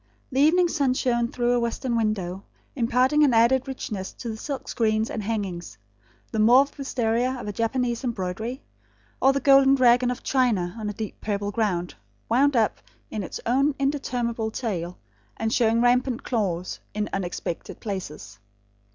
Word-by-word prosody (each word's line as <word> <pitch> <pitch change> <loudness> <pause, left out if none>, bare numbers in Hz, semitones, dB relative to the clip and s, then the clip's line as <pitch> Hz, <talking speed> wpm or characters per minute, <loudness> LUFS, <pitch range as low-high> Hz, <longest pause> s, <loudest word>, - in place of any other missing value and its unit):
The 265 - 0
evening 350 +4 +5
sun 275 -6 +1
shone 240 -2 +1
through 240 0 0
a 245 - +2
western 235 +1 -2
window, 200 -4 -1 0.3
imparting 255 +4 +3
an 265 -5 +4
added 250 +4 +4
richness 210 -7 -5
to 235 - -7
the 220 - -4
silk 270 +5 -5
screens 220 -2 0
and 220 - -3
hangings; 195 - -4 0.5
the 220 - -2
mauve 250 +6 +5
wistaria 250 -2 -1
of 225 - -7
a 205 - -3
Japanese 235 +2 -1
embroidery; 220 +2 -3 0.6
or 270 - +6
the 275 - 0
golden 275 -1 +6
dragon 250 -1 +4
of 250 0 -4
China 225 -9 +1
on 210 -1 -3
a - - -4
deep 215 0 -7
purple 205 -1 -2
ground, 190 -5 -1 0.4
wound 270 +4 +3
up 225 -3 +1 0.3
in 215 - -3
its 185 - -6
own 275 +4 +2
interminable 245 -5 -1
tail, 180 -7 -4 0.4
and 225 0 -1
showing 230 0 +3
rampant 245 0 +2
claws 185 -7 -2 0.2
in 210 0 -1
unexpected 175 -3 -4
places. 150 - -6
235 Hz, 160 wpm, -25 LUFS, 210-255 Hz, 0.6 s, or